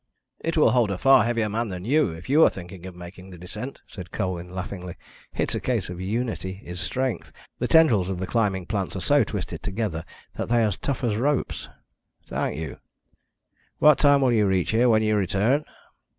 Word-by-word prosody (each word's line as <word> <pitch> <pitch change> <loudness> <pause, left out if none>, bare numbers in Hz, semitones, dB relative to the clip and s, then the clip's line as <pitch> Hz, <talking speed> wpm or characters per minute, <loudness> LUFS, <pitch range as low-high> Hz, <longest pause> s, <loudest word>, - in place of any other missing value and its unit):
"It 165 0 -2
will 150 - +5
hold 115 -2 +3
a 100 - -2
far 135 +3 +5
heavier 115 -2 0
man 115 +3 -2
than 90 -2 -6
you, 145 +1 +3
if 80 +1 -9
you 150 +5 +5
are - - +7
thinking 90 0 -9
of 90 - -10
making 90 +2 -11
the 90 - -11
descent," 105 +9 -8
said 90 -4 -9
Colwyn 90 -3 -3
laughingly. 90 -1 -6 0.4
"It's - - 0
a - - -1
case - - -1
of 90 0 -7
unity 100 -2 -3
is 90 0 -5
strength. 125 +5 -2 0.3
The - - 0
tendrils 120 - +4
of 95 - -2
the 95 - -3
climbing 95 -4 0
plants 100 -1 -3
are - - -2
so - - +3
twisted - - -5
together 100 -5 -3 0.3
that - - -3
they 120 -1 +3
are 110 - +3
as 95 - -4
tough 140 -2 -3
as 110 -4 +1
ropes." 140 +4 -1 0.5
"Thank - - -3
you. 80 -4 -6 1.0
What 150 -1 +6
time 145 -1 +5
will 130 -2 +3
you 105 -3 +3
reach 95 -4 +1
here 120 +3 +3
when 110 -1 +4
you 110 0 +2
return?" 105 - +1
105 Hz, 205 wpm, -25 LUFS, 90-120 Hz, 1.0 s, are